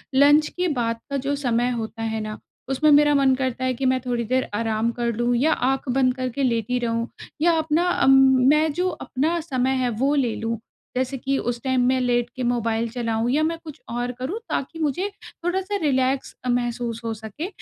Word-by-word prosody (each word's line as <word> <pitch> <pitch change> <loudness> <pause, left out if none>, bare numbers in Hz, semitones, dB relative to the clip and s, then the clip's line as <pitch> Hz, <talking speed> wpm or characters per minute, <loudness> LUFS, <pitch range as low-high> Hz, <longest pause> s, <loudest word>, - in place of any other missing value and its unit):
Lunch 290 +2 +6
के 360 0 -2
बाद 230 -1 -1
का 280 - -1
जो 285 +1 +1
समय 245 -3 0
होता 225 -1 -4
है 220 0 -2
ना, 215 0 -5 0.3
उसमें 300 +3 +3
मेरा 295 0 +6
मन 270 -1 +4
करता 260 -1 -2
है 255 - +1
कि 265 +2 -3
मैं 260 0 +3
थोड़ी 240 -1 -1
देर 255 +3 0
आराम 225 +1 0
कर 235 0 -1
लूँ 240 +1 +1
या 300 +6 +3
आँख 265 +1 -1
बंद 255 0 +2
करके 255 +1 -2
लेटी 240 0 0
रहूँ 230 0 -1 0.3
या 340 +2 +5
अपना 320 +3 +1
अम 270 -6 +4 0.4
मैं 305 +1 +4
जो 360 +3 0
अपना 315 0 -1
समय 260 -5 -1
है, 250 - +1
वो 265 +6 +1
ले 245 -5 +1
लूँ। 230 0 -2 0.4
जैसे 260 +1 -1
कि 270 +2 -1
उस 240 0 -2
टाइम 260 -1 +1
मैं 260 0 +2
लेट 240 -1 +1
के 255 - -3
मोबाइल 230 -1 0
चलाऊँ 230 -1 -1
या 295 - +2
मैं 330 +1 0
कुछ 310 -3 -10
और 245 +1 -2
करूँ, 275 - -3
ताकि 325 +4 -3
मुझे 320 +6 0 0.4
थोड़ा-सा 380 +3 -1
रिलैक्स 265 -2 0
अ, - - -1
महसूस 240 -1 -1
हो 225 - -1
सके। 220 - -6
255 Hz, 205 wpm, -23 LUFS, 235-285 Hz, 0.4 s, Lunch